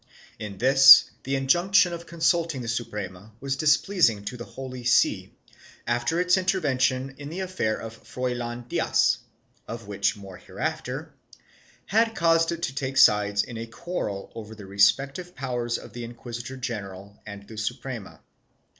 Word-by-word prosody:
1 105 -2 -6
In - - -15
this, 135 +4 +8
the 135 +1 -1
injunction 175 +7 +3
of 170 0 -7
consulting 165 -4 0
the - - -6
Suprema 105 -3 -5
was 135 0 -2
displeasing 150 - +2
to 125 - -5
the 120 -1 -8
Holy 130 -2 -8
See, 125 +1 +2 0.5
after 120 +8 0
its 180 +1 +3
intervention 135 -8 0
in 145 0 -7
the 175 +4 -5
affair 185 -13 -1
of 115 0 -8
Froilan 120 -1 -4
Diaz - - +2 0.5
(of 115 -2 -7
which 100 +1 0
more 95 -2 -11
hereafter) - - -5 0.7
had 225 +2 +2
caused 165 -2 +3
it 170 0 -5
to 130 - -1
take 135 0 -3
sides 105 -4 +5
in 115 - -8
the 115 +1 -6
quarrel 115 - -5
over 110 -1 -9
the 105 -2 -11
respective 135 - +1
powers 120 -3 -2
of 115 - -12
the 120 0 -6
inquisitor 120 +2 -7
general 100 -5 -7
and 100 -1 -9
the 110 - -11
Suprema. 120 0 -5
125 Hz, 155 wpm, -25 LUFS, 110-155 Hz, 0.7 s, this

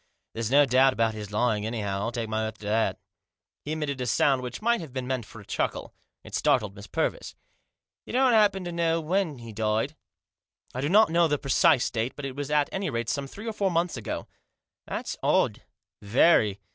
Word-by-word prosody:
There's 115 -1 -3
no 145 +2 +6
doubt 130 +1 +4
about 115 -2 +1
his 105 -1 -7
lying, 105 -1 +1
anyhow, 105 -3 -2
I'll 115 +4 -2
take 120 -2 -3
my 110 0 -1
oath 110 0 -8
to 105 - -12
that" 110 +2 +1 0.7
He 150 - -3
emitted 145 -4 -3
a 125 - -2
sound 135 +3 +2
which 125 -1 -6
might 235 0 +1
have 155 -6 -9
been 130 -1 -3
meant 125 -4 -3
for 115 - -12
a 105 - -13
chuckle. - - -3 0.3
It - - -13
startled 105 -2 +1
Miss 100 0 -10
Purvis. - - -2 0.7
"You - - -7
don't 255 0 +4
happen 205 -3 +4
to 175 - -5
know 165 -1 +1
when 165 -2 -1
he 115 -2 -10
died? 110 0 -1 0.3
" - - -66
" - - -35
I 130 - -3
do 145 - 0
not 210 0 +5
know 170 0 +4
the 145 -1 +1
precise 140 0 +3
date, 115 +2 -2
but 145 - -6
it 135 -1 -5
was 145 0 -4
at 150 -1 +2
any 190 -1 -2
rate 120 -3 -2
some 140 -1 -2
three 205 +10 -10
or 225 - -3
four 200 -2 0
months 170 0 0
ago." 115 -4 -5 0.3
" - - -63
That's - - -4
odd, - - +2 0.4
very. 105 - +3
130 Hz, 220 wpm, -27 LUFS, 110-165 Hz, 0.7 s, no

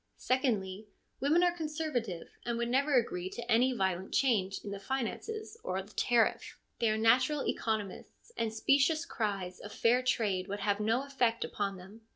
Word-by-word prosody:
Secondly, 215 -6 0 0.3
women 310 +6 +3
are 350 -1 +3
conserva 310 -6 -2
tive, 180 -7 -7
and 235 -1 -2
would 235 0 -1
never 275 +3 +2
agree 185 -7 +1
to 235 +4 -6
any 245 +4 +4
violent 190 -5 -1
change 200 -8 +2
in 205 - -6
the 200 - -5
finances 350 - -4
or 185 - -2
the 205 - -17
tariff; 235 -2 +1 0.2
they 230 - +3
are 215 - +1
natural 255 +6 +3
economists, 220 - -3
and 225 -1 -1
specious 280 +8 +2
cries 195 -5 -3
of 205 - -9
fair 240 +4 +3
trade 210 -7 0
would 200 0 -4
have 205 0 +1
no 225 +5 +1
effect 245 -4 +1
upon 200 -2 -3
them. 195 +5 -13
230 Hz, 175 wpm, -32 LUFS, 200-265 Hz, 0.3 s, any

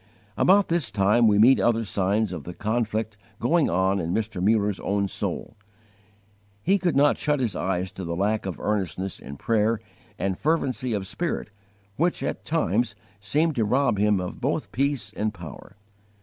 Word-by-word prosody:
About 200 +1 +4
this 165 -7 +1
time 105 +3 +3
we 105 -1 +4
meet 120 +6 +6
other 115 -1 +2
signs 100 +1 +1
of 80 -5 -6
the 90 - -8
conflict 110 -1 -2 0.2
going 155 +6 +2
on 95 +3 +1
in 85 -1 -2
Mr. 110 -4 -2
Mullers 105 -1 +2
own 100 0 0
soul. - - -4 1.1
He 195 +3 +3
could 175 -4 0
not 145 +1 +4
shut 150 -1 +1
his 115 -7 -1
eyes 90 0 -1
to 95 0 -7
the 85 -1 -3
lack 100 +2 0
of 90 -5 -5
earnestness 95 -2 -2
in 70 +1 -9
prayer 110 +4 +1 0.4
and 95 -1 -2
fervency 135 -6 0
of 100 -2 -2
spirit 165 - -3 0.5
which 170 +3 +1
at - - -3
times 120 - 0 0.2
seemed 150 +11 +1
to 115 - +3
rob 120 -1 +2
him 105 -1 +3
of 90 -1 -6
both - - -1
peace 135 -5 -1
and 105 0 -2
power. 100 - -10
105 Hz, 170 wpm, -25 LUFS, 95-130 Hz, 1.1 s, meet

